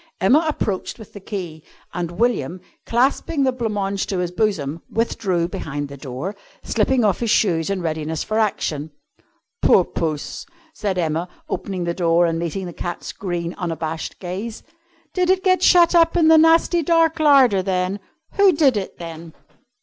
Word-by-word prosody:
Emma 275 - +4
approached 205 -10 -2
with 220 -4 -13
the 205 - -8
key, 180 -6 -6 0.3
and 175 -1 -3
William, 215 - 0 0.3
clasping 275 +5 +1
the 260 - +3
blanc 240 -3 -3
mange 200 -1 -2
to 195 - -2
his 180 -1 -2
bosom, 175 -7 -1
withdrew 195 -6 -1
behind 145 -4 -5
the 140 - -8
door, 140 +8 -6 0.3
slipping 240 +3 +1
off 200 -4 +1
his 235 - -1
shoes 170 -6 +2
in 195 -3 -2
readiness 160 -1 -2
for 215 0 -1
action. 160 -8 -1 0.7
"Poor - - +5
Puss!" 155 -3 -4 0.3
said 200 -8 -2
Emma, 165 +1 -1 0.2
opening 190 -3 -4
the 170 0 -1
door 170 -1 +2
and 165 -1 -1
meeting 170 +3 -3
the 175 - -7
cat's 175 +1 -5
green, 175 -3 -4
unabashed 165 -2 -4
gaze. 195 +5 -6 0.5
"Did 365 -1 +1
it 375 0 +2
get 370 -1 +3
shut 345 -1 +5
up 335 0 +4
in 320 -2 +5
the 320 - +7
nasty 330 +2 +4
dark 330 0 +2
larder, 270 -10 +5
then? 185 +1 -1 0.4
Who 400 -2 +6
did 285 -7 +3
it, 195 - -5
then?" 165 -1 -9
195 Hz, 165 wpm, -21 LUFS, 170-250 Hz, 0.7 s, the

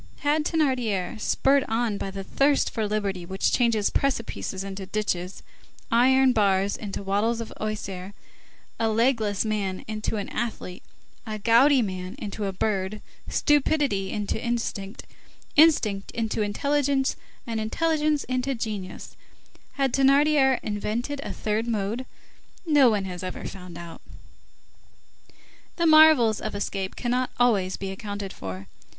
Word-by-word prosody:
Had 300 +1 +1
Thénardier, 245 - 0
spurred 275 +4 +3
on 225 -2 -1
by - - -3
that 195 0 -6
thirst 280 +5 +2
for 220 -3 -1
liberty 200 -4 -2
which 190 +2 -1
changes 230 -4 +2
precipices 230 -7 -2
into 195 -1 -6
ditches, 190 -3 -3 0.5
iron 260 +2 +5
bars 200 -2 +2
into 200 -2 -6
wattles 210 +4 0
of 230 - -6
osier, 200 -3 -5 0.6
a 225 -1 +2
legless 220 -3 +1
man 200 -4 -2
into 215 0 -3
an 200 - -3
athlete, 215 -6 -4 0.5
a 215 -1 -3
gouty 240 +5 +5
man 185 -2 -5
into 210 0 -5
a 195 - -1
bird, 195 +1 -2 0.3
stupidity 285 -9 +1
into 210 +2 -3
instinct, 230 -4 -3 0.5
instinct 240 -11 +4
into 225 -1 -1
intelligence, 275 +5 +1 0.3
and 230 -2 -3
intelligence 305 +6 0
into 255 +1 -1
genius, 210 -5 -6 0.6
had 270 -3 0
Thénardier 275 -1 +4
invented 225 +7 -3
a - - -5
third 215 +2 -2
mode? 225 +3 -2 0.6
No 290 -6 +5
one 205 -3 0
has 180 -2 -6
ever 185 -1 -6
found 180 -3 -8
out. 170 -1 -9 1.7
The 340 - 0
marvels 310 -8 +6
of - - -4
escape 195 -1 -3
cannot 250 +1 -1
always 200 -7 +2
be 195 0 -5
accounted 200 0 -6
for. 95 0 -7
220 Hz, 130 wpm, -25 LUFS, 195-260 Hz, 1.7 s, marvels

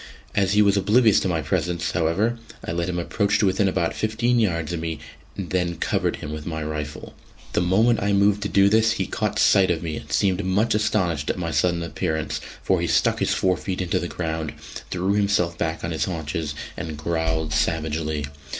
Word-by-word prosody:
As 100 -1 +2
he 105 0 +5
was 100 0 +3
oblivious 110 +2 +4
to - - -1
my 80 -3 -1
presence, 90 -1 -1
however, 95 +8 0 0.3
I - - -3
let 85 +1 -1
him 90 - -2
approach 100 +4 +1
to - - +2
within 95 +1 +2
about 90 -3 0
fifteen 120 +3 +1
yards 85 -6 0
of 85 - -2
me, 80 -1 -3 0.4
and 95 -3 -5
then 90 -2 0
covered - - 0
him 75 - -7
with 75 -1 -6
my 80 -2 -3
rifle. 75 -1 -5 0.4
The - - +2
moment 110 +6 +3
I 100 +1 +1
moved 100 +1 +3
to 100 - -2
do 100 0 +5
this, 110 +2 +4
he - - -1
caught - - -2
sight 95 -1 +5
of 85 -1 0
me, 80 -2 -3
and - - -10
seemed 95 -1 +1
much 100 +5 +1
astonished 90 -8 0
at - - -1
my 85 -2 -2
sudden 85 +3 +1
appearance, 80 0 -2 0.2
for 95 -3 +2
he 85 - 0
stuck - - +2
his - - +1
forefeet 95 0 0
into 90 -2 0
the 85 - -3
ground, 80 -3 -3 0.4
threw 95 +2 0
himself 100 -4 +1
back 80 -1 -2
on 85 - -2
his 80 - 0
haunches 80 -3 -3 0.2
and 80 -2 -5
growled 80 -1 -1
savagely. 80 -1 -1
90 Hz, 205 wpm, -23 LUFS, 80-100 Hz, 0.4 s, he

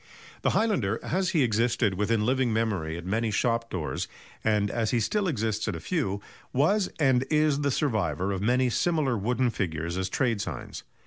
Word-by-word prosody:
The - - +2
highlander, 130 - +1
as 185 +2 0
he 160 -7 +3
existed 115 -2 +2
within 105 +3 +1
living 130 0 +2
memory 100 -8 -1
at 85 - -8
many 110 +4 0
shop 115 +2 0
doors, 85 -5 -3 0.4
and 105 -2 +2
as 115 -2 0
he 120 - +2
still 200 - 0
exists 110 - -1
at - - -1
a - - -5
few, 125 - -1 0.3
was 185 +9 +2
and 130 -4 +3
is 150 -2 +2
the 140 - +1
survivor 100 - 0
of 95 -1 -2
many 125 +3 +2
similar 155 -4 +1
wooden 120 +4 +1
figures 85 -3 -2
as 95 0 -1
trade 115 -2 0
signs. 80 -10 -6
115 Hz, 180 wpm, -27 LUFS, 100-135 Hz, 0.4 s, he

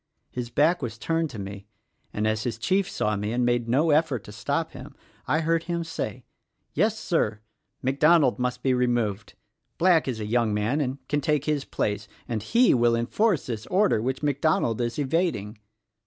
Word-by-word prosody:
His 125 -1 -4
back 155 +7 +2
was 115 -4 -4
turned 165 +7 -1
to 125 - -9
me 100 0 -7 0.4
and 105 - -2
as 110 0 0
his 115 -1 -3
chief 190 +10 +1
saw 105 0 -1
me 105 +2 -2
and 120 +1 +1
made 120 -1 +1
no 150 +6 +3
effort 145 -7 +2
to - - -11
stop 105 0 -2
him - - -11 0.3
I 155 +5 +2
heard 165 0 +1
him 170 -1 -2
say: 160 -6 -5 0.5
'Yes, 210 +7 +1
Sir! 110 - -1 0.4
MacDonald 140 +1 +4
must 125 0 -2
be 130 - +3
removed. 120 -5 0 0.4
Black 170 -3 +4
is 120 -4 -2
a 105 - -3
young 110 -1 +1
man 110 +9 0
and 130 -1 -2
can 145 0 0
take 150 0 0
his 150 -3 0
place, 105 0 -2 0.2
and 115 -3 -2
he 235 - +4
will 120 -1 +3
enforce 160 - +1
this 115 -2 -5
order 190 - +2
which 130 +4 -2
MacDonald 145 -5 +1
is 120 0 -1
evad 165 +5 +1
ing.' 105 +2 -8
125 Hz, 185 wpm, -26 LUFS, 110-160 Hz, 0.5 s, MacDonald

